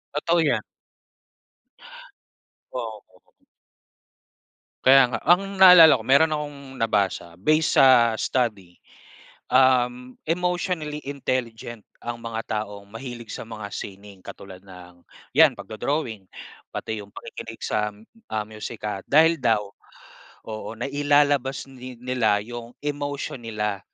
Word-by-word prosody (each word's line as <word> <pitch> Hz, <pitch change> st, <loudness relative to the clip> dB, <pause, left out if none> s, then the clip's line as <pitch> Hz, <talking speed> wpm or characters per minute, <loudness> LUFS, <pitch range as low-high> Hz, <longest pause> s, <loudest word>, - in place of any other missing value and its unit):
Totoo 170 Hz, +3 st, +1 dB
yan. 155 Hz, -3 st, +1 dB, 2.1 s
Oo. 110 Hz, -4 st, -6 dB, 1.8 s
Kaya 135 Hz, +1 st, +8 dB
nga. 115 Hz, -, -2 dB
Ang 195 Hz, +4 st, +3 dB
naalala 180 Hz, -4 st, +10 dB
ko, -, -, -5 dB
mayro'n 150 Hz, +4 st, +4 dB
akong 145 Hz, -1 st, -6 dB, 0.2 s
nabasa 100 Hz, -5 st, 0 dB
based 155 Hz, -, +2 dB
sa 120 Hz, -4 st, +6 dB
study, 105 Hz, -9 st, -2 dB, 0.8 s
um, 125 Hz, -1 st, +2 dB
emotionally 175 Hz, -3 st, -2 dB
intelligent 120 Hz, -5 st, -4 dB, 0.2 s
ang 120 Hz, 0 st, -6 dB
mga 115 Hz, -1 st, -4 dB, 0.2 s
taong 100 Hz, -1 st, -11 dB
mahilig 120 Hz, +1 st, -8 dB
sa -, -, -6 dB
mga 110 Hz, -2 st, -7 dB
sining 100 Hz, -1 st, -9 dB
katulad 95 Hz, -2 st, -11 dB
ng, 90 Hz, -2 st, -14 dB, 0.3 s
'yan, 155 Hz, -3 st, +7 dB
pagdo-drawing, 115 Hz, -2 st, -4 dB, 0.5 s
pati 110 Hz, -1 st, -4 dB
'yong 100 Hz, 0 st, -13 dB
pakikinig 115 Hz, 0 st, -9 dB
sa, 105 Hz, 0 st, -1 dB, 0.4 s
ah, 110 Hz, -1 st, -1 dB
musika. 105 Hz, -2 st, -6 dB
Dahil 160 Hz, +3 st, +4 dB
daw 110 Hz, -4 st, +1 dB, 0.8 s
oo, 110 Hz, 0 st, -6 dB
nailalabas 145 Hz, 0 st, +1 dB
ni 130 Hz, -2 st, -10 dB
nila 125 Hz, -4 st, +1 dB
'yong 120 Hz, +1 st, -9 dB
emotion 145 Hz, -3 st, -4 dB
nila 105 Hz, -3 st, -3 dB
120 Hz, 110 wpm, -24 LUFS, 110-145 Hz, 2.1 s, naalala